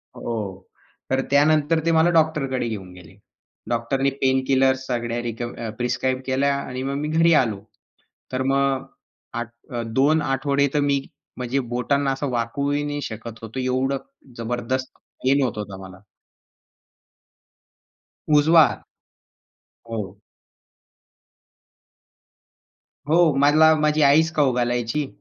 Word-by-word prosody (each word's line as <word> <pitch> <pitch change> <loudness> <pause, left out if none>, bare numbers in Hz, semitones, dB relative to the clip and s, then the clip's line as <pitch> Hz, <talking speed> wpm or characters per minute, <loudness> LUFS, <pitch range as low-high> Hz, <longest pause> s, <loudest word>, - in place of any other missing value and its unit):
हो. 120 - -5 0.8
तर 130 0 +2
त्यानंतर 150 +2 +3
ते 165 - +3
मला 160 +1 +4
डॉक्टरकडे 145 -6 +1
घेऊन 100 -5 -6
गेले. 90 -3 -15 0.5
डॉक्टरनी 120 +4 0
पेनकिलर 130 0 +3
सगळ्या 120 -1 -2
रिक्व्ह 120 -1 -5
प्रिस्क्राईब 125 +1 -1
केल्या 140 +1 +1
आणि 130 -2 -5
मग 135 +1 -2
मी 150 - -2
घरी 165 +1 +4
आलो. 110 -6 -2 0.7
तर 130 0 0
मग 135 -1 +1 0.6
आठ 120 - -6 0.2
अ, 120 -1 -3
2 140 +7 +2
आठवडे 140 0 +1
तर 150 - +2
मी 140 -1 +1 0.4
म्हणजे 125 +2 -1
बोटांना 140 +3 +1
असं 135 +1 -3
वाकवूही 140 +5 -1
नाही 145 0 -3
शकत 115 -1 -7
होतो. 115 +4 -6
एवढं 130 +2 0 0.4
जबरदस्त 120 +2 -3 0.3
पेन 135 +2 +3
होत 120 -4 -2
होतं 100 -2 -6
मला. 95 0 -11 2.4
उजवा 160 +2 +6
हात. - - -6 1.1
हो. 110 -4 -5 2.9
हो, 165 -1 +4
मला 155 +3 +6
माझी 150 0 +2
आईच 155 +3 +4
खाऊ 140 -4 +3
घालायची. 120 +3 -1
135 Hz, 115 wpm, -23 LUFS, 120-145 Hz, 2.9 s, उजवा